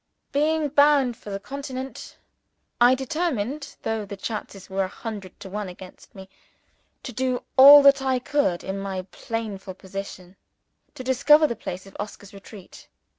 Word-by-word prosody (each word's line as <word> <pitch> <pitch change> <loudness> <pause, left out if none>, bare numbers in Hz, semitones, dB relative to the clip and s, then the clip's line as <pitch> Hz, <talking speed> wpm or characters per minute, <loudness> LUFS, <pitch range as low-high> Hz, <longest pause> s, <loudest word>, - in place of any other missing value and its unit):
Being 305 +1 +1
bound 285 -3 +4
for 220 - -12
the 195 0 -4
Continent, 270 +3 -7 0.7
I 260 - +4
determined 275 -1 -3
(though 225 -1 -2
the 200 0 -8
chances 195 -2 -6
were 195 0 -1
a - - -4
hundred 200 -2 -8
to 200 - -8
one 205 0 -5
against 180 +1 -13
me) 190 -1 -11 0.8
to 250 - -7
do 255 +1 -1
all 280 +2 +10
that 275 -1 +6
I 265 -1 +1
could, 250 -8 0
in 195 +1 -4
my 190 -1 -4
painful 210 -5 -5
position, 190 -1 -9 0.6
to 255 - -7
discover 280 +4 +5
the 235 - -1
place 185 -4 -7
of 195 - -15
Oscar's 205 -1 -8
retreat. 200 -1 -13
225 Hz, 155 wpm, -24 LUFS, 195-275 Hz, 0.8 s, all